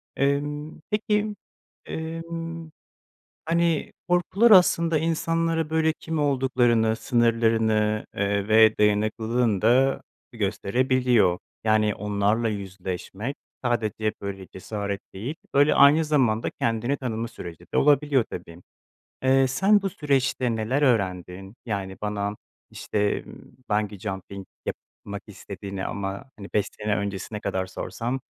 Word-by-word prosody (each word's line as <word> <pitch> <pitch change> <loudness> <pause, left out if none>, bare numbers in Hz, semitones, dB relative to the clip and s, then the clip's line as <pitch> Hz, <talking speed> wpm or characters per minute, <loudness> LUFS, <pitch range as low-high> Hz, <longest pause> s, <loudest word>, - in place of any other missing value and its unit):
Emm, 145 +2 -1
peki, 210 0 0 0.5
emm, 165 0 -5 0.8
hani, 165 -1 +1 0.2
korkular 185 +6 +3
aslında 170 -4 +5
insanlara 165 0 0
böyle 160 0 +2
kim 160 -1 -3
olduklarını, 125 -5 +2
sınırlarını, 115 -3 +2
eee, 100 0 0
ve 110 0 +6
dayanıklılığını 110 +1 +1
da 130 +4 +3 0.3
gösterebiliyor. 115 -1 +2 0.3
Yani, 110 -1 +3
onlarla 105 +3 0
yüzleşmek 100 +4 -5 0.3
sadece 110 -3 0
böyle 95 -1 -5
cesaret 100 +1 -4
değil, 115 +10 -4 0.2
böyle, 145 +2 +5
aynı 145 +3 +6
zamanda 130 -8 +1
kendini 115 +4 0
tanıma 115 -4 -3
süreci 85 -5 -10
de - - +3
olabiliyor 145 -3 +4
tabii. 85 0 -8 0.6
Eee, 135 0 +4
sen 195 +10 +3
bu 195 - -1
süreçte 135 - 0
neler 115 +6 0
öğrendin? 95 -5 0
Yani 100 -4 -4
bana 105 0 -2 0.4
işte, 105 -1 -1 0.5
bungee 105 -2 -1
jumping 95 -1 -6 0.2
yapmak 100 0 -7
istediğini 100 -1 -7
ama, 100 +6 -4
hani, 100 - -8
5 100 -1 +2
sene 105 0 0
öncesine 100 +1 -4
kadar 95 -2 -2
sorsam 120 +6 -4
115 Hz, 110 wpm, -25 LUFS, 100-145 Hz, 0.8 s, ve